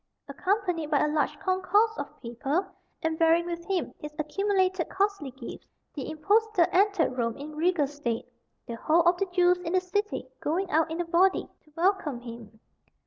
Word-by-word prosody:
Accompanied 365 -6 -1
by 295 -2 +3
a - - +1
large 300 -2 0
concourse 400 +4 +2
of - - -7
people, 270 +10 -1 0.4
and 320 0 -1
bearing 330 +1 +4
with 340 -1 -4
him 380 -4 -1
his 300 0 -8
accumulated 375 +2 0
costly 395 -7 0
gifts, 255 -2 -10 0.3
the 280 -1 -5
impostor 400 +4 +2
entered 385 -8 +2
Rome 230 -2 -1
in 300 +2 -8
regal 330 -1 +2
state, 270 -5 -3 0.4
the 235 - -6
whole 330 +7 +3
of 345 +1 +4
the 390 - 0
Jews 360 0 +3
in 355 -1 -4
the 370 - +5
city 410 +3 -2
going 365 +5 -1
out 320 +1 +3
in 325 +2 -2
a - - -3
body 365 +3 +3 0.2
to 305 - -25
welcome 340 -7 +1
him. 230 -2 -10
340 Hz, 175 wpm, -28 LUFS, 300-375 Hz, 0.4 s, the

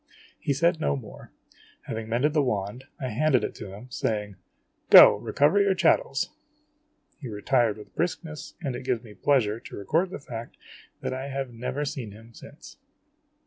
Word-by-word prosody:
He - - -1
said 170 +4 +2
no 155 - +1
more. 120 -7 -10 0.5
Having 110 0 -5
mended 130 +6 +1
the 155 - +3
wand, 115 0 -2
I 130 - -3
handed 130 0 +2
it - - -3
to 95 - -8
him, 125 +6 -11
saying: 105 -4 -2 0.3
" - - -48
Go, - - +10
recover 155 +8 +2
your 200 -1 +3
chattels! 480 - +2 0.4
" 305 +1 -43
He 135 - -6
retired 110 +1 +1
with 105 - -13
briskness, 165 -3 -3
and 135 -6 -3
it 125 - -6
gives 125 -2 -1
me 110 -3 -12
pleasure 115 -3 +1
to - - -10
record 160 - 0
the - - -6
fact 120 -4 -8 0.4
that - - -3
I 130 +1 -4
have 135 -2 -4
never 125 +5 -3
seen 135 -8 -5
him 115 +2 -15
since. 145 - -13
130 Hz, 180 wpm, -26 LUFS, 110-150 Hz, 0.5 s, Go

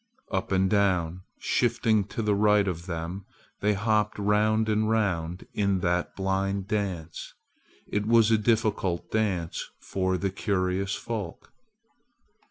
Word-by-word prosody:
Up 95 -1 -2
and 95 0 +3
down! 95 -4 +1 0.2
Shifting 115 -3 +1
to 110 +3 -4
the 105 -1 +2
right 105 0 +4
of 85 -1 -4
them 85 +3 -5 0.3
they 105 +1 +2
hopped 105 +1 +1
round 105 +2 +2
and 110 0 +1
round 90 -6 0
in 100 -2 +1
that 90 0 0
blind 95 0 -1
dance. 95 -7 -3 0.5
It 105 0 -1
was 115 -1 +5
a 110 - +5
difficult 105 -6 0
dance 95 -7 -1 0.2
for 95 -1 -1
the 95 +1 -1
curious 95 0 -1
folk. 105 -7 -6
100 Hz, 130 wpm, -27 LUFS, 95-105 Hz, 0.5 s, was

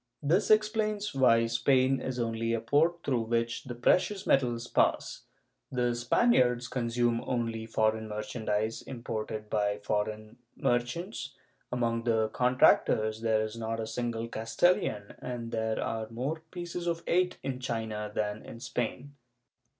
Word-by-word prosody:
This 180 +7 +2
explains 215 -2 +2
why 115 -4 +4
Spain 130 +3 +2
is 130 -1 -3
only 115 -1 -1
a 115 - +1
port 155 +9 +2
through 125 -4 +1
which 115 +2 -1
the 120 -2 -6
precious 185 - +2
metals 120 -3 +2
pass; - - +1 0.5
the 125 -1 +1
Spaniards 125 - +3
consume 120 -1 0
only 115 -2 -2
foreign 110 0 +1
merchandise 105 0 -2
imported 110 -3 -5
by 105 -1 0
foreign 110 +2 -3 0.2
merchants; 130 - -2 0.4
among 115 -1 0
the 110 -2 +2
contractors 110 -3 +3
there 110 -1 +2
is 110 +1 -5
not 115 0 -3
a 110 - -2
single 115 0 -3
Castilian, 115 - +1
and 120 -2 -5
there 110 -1 -1
are 110 -1 -3
more 130 +8 -3
pieces 175 0 -5
of 170 0 -1
eight 180 +1 +1
in 130 -2 -3
China 110 -4 -3
than 105 0 -2
in 115 - -10
Spain. 125 +4 -4
115 Hz, 135 wpm, -30 LUFS, 110-130 Hz, 0.5 s, why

